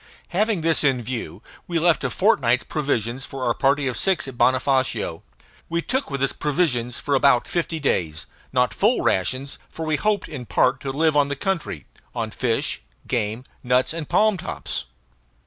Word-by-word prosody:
Having 205 0 +1
this 165 -1 +3
in 130 -4 +2
view, 120 0 -5 0.2
we 170 - -1
left 165 0 +3
a - - 0
fortnight's 130 - +2
provisions 130 -4 -2
for 135 -2 -6
our 120 - +2
party 140 +2 +2
of 125 - -1
six 190 -7 +1
at 130 - -7
Bonofacio. 130 -8 +1 0.5
We 170 0 -1
took 265 - -1
with 140 -2 -2
us 135 - +1
provisions 135 -6 0
for 145 - -2
about 135 -3 +4
fifty 165 -2 -1
days; 80 - -1 0.3
not - - +2
full - - +2
rations, 130 +9 0
for 160 - -6
we 155 -1 +1
hoped 210 +1 0
in 130 -6 -7
part 125 +7 +2
to 135 - -4
live 155 +2 +2
on 145 -1 +4
the 140 - -1
country 170 - -3 0.3
on 115 -2 -2
fish, 115 0 -1 0.3
game, 115 -1 -1 0.2
nuts, 125 +3 +2
and 165 -3 -5
palm 215 -2 +3
tops. 160 - -4
135 Hz, 175 wpm, -23 LUFS, 125-165 Hz, 0.5 s, about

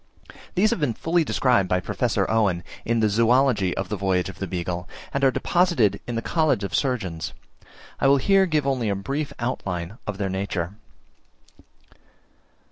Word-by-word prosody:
These 210 +4 +3
have - - -1
been 125 -7 0
fully 170 +1 +1
described 125 -9 +2
by 90 - +2
Professor - - 0
Owen, 100 -6 +1 0.2
in 115 0 +1
the 110 - +4
Zoology 115 -2 +3
of 95 -1 -3
the 105 - -1
voyage 95 -2 0
of 95 - -10
the 95 - -3
Beagle, 90 0 -4 0.2
and 140 - -1
are 135 - +6
deposited 130 - +2
in 120 - -3
the 115 - -2
College 155 -11 +1
of 100 - -4
Surgeons. 95 - -1 0.7
I - - +3
will 140 +1 +6
here 195 +6 +4
give 155 -4 +1
only 130 -5 0
a 100 - 0
brief 140 +9 -3
outline 100 -5 -4
of 105 -2 -3
their 100 -1 -1
nature. 95 -2 -3
110 Hz, 170 wpm, -24 LUFS, 95-135 Hz, 0.7 s, are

